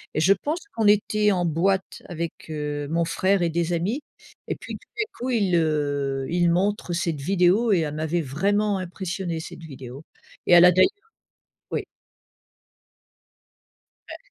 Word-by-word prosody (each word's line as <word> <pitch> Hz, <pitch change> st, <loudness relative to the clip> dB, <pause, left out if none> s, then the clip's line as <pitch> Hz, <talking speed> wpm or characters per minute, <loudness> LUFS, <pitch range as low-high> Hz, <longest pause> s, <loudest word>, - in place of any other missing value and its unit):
Je 170 Hz, +6 st, +5 dB
pense 300 Hz, -, -3 dB, 0.2 s
qu'on 220 Hz, -2 st, +2 dB
était 210 Hz, 0 st, +3 dB
en 180 Hz, -2 st, +1 dB
boîte 190 Hz, +4 st, 0 dB
avec, 170 Hz, -2 st, -4 dB, 0.2 s
heu, 150 Hz, -1 st, -3 dB
mon 165 Hz, +1 st, +1 dB
frère 190 Hz, +3 st, +1 dB
et 170 Hz, -, +1 dB
des 170 Hz, +1 st, -1 dB
amis 195 Hz, -, -1 dB, 0.5 s
et -, -, -2 dB
puis, -, -, -8 dB
tout -, -, -24 dB
d'un 425 Hz, -, +1 dB, 0.2 s
coup, 250 Hz, +2 st, -3 dB
il 210 Hz, -6 st, +1 dB
le 145 Hz, -5 st, 0 dB
il 175 Hz, 0 st, +2 dB
montre 185 Hz, +1 st, 0 dB
cette 170 Hz, -3 st, -1 dB
vidéo 195 Hz, +7 st, +3 dB
et 185 Hz, -, +3 dB
elle 150 Hz, -2 st, -2 dB
m'avait 160 Hz, +2 st, -1 dB
vraiment 200 Hz, +8 st, 0 dB
impressionnée 185 Hz, -2 st, -4 dB
cette 165 Hz, -, -10 dB
vidéo. 135 Hz, -2 st, -9 dB, 0.4 s
Et -, -, +5 dB
elle 175 Hz, 0 st, +9 dB
a 180 Hz, -, +8 dB
d'ailleurs 185 Hz, +1 st, +5 dB, 0.8 s
oui. -, -, -2 dB, 2.2 s
Ouais. -, -, -7 dB
175 Hz, 155 wpm, -24 LUFS, 155-195 Hz, 2.2 s, elle